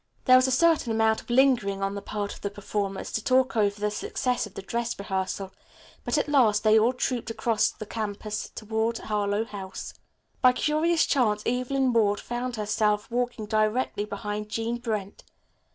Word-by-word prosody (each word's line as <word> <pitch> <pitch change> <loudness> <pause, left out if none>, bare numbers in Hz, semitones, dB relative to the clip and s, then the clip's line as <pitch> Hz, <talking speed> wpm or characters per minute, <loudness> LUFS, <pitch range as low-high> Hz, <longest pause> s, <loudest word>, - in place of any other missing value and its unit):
There 255 - +7
was 255 +1 +5
a - - 0
certain 310 -2 +3
amount 220 0 +2
of - - -22
lingering 240 -6 +3
on 195 0 -1
the 200 - -5
part 205 -1 -4
of - - -13
the 200 - -2
performers 200 -1 -4
to 220 - -2
talk 260 0 +2
over 205 -2 +1
the 210 0 0
success 245 +2 -1
of 200 - -18
the 195 - -6
dress 235 +3 -2
rehearsal, 190 -1 -3 0.5
but - - 0
at 290 - +1
last 230 -8 +3
they 215 0 +6
all 230 +3 +3
trooped 250 -2 -2
across 225 -1 +1
the 215 - -9
campus 210 0 -4
to 220 +1 -1
Harlowe 210 0 0
House. 195 -4 -7 0.5
By 250 0 +6
curious 315 +4 +2
chance 215 -6 +1
Evelyn 255 +1 0
Ward 205 -3 +3
found 245 +1 -4
herself 210 0 0
walking 245 -2 -2
directly 215 0 0
behind 210 +1 -5
Jean 230 +2 -2
Brent. 215 -5 -4
220 Hz, 175 wpm, -26 LUFS, 205-250 Hz, 0.5 s, There